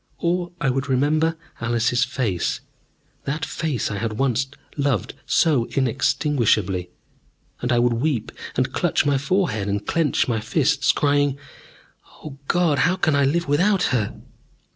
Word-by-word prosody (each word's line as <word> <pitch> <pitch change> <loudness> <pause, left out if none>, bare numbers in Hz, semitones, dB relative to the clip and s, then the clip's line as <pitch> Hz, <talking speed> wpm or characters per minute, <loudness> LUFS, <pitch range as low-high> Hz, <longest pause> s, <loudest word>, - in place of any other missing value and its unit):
Or 175 0 -1
I 140 -5 +1
would 135 +2 -2
remember 155 +5 +2 0.2
Alice's 120 +1 +1
face, 110 -10 -1 0.6
that 150 +3 -2
face 145 -10 -2
I 100 - -3
had 115 0 -2
once 130 +2 0 0.3
loved 140 - 0
so 140 -8 +3
inextinguishably, 115 - +1 0.7
and 125 - -1
I 120 - +3
would 120 0 +3
weep 125 -1 -1 0.2
and - - 0
clutch - - +1
my 140 -1 +2
forehead, 140 - 0
and 100 +1 -2
clench 165 -4 +1
my 115 -3 0
fists, 140 +3 +2
crying, 145 -2 +1 0.9
"O 140 -3 -9
God, 170 -5 +2
how 175 +6 +3
can 155 -5 +1
I 140 -1 +3
live 170 +5 0
without 180 +6 +2
her!" 110 -5 0
135 Hz, 140 wpm, -22 LUFS, 120-155 Hz, 0.9 s, so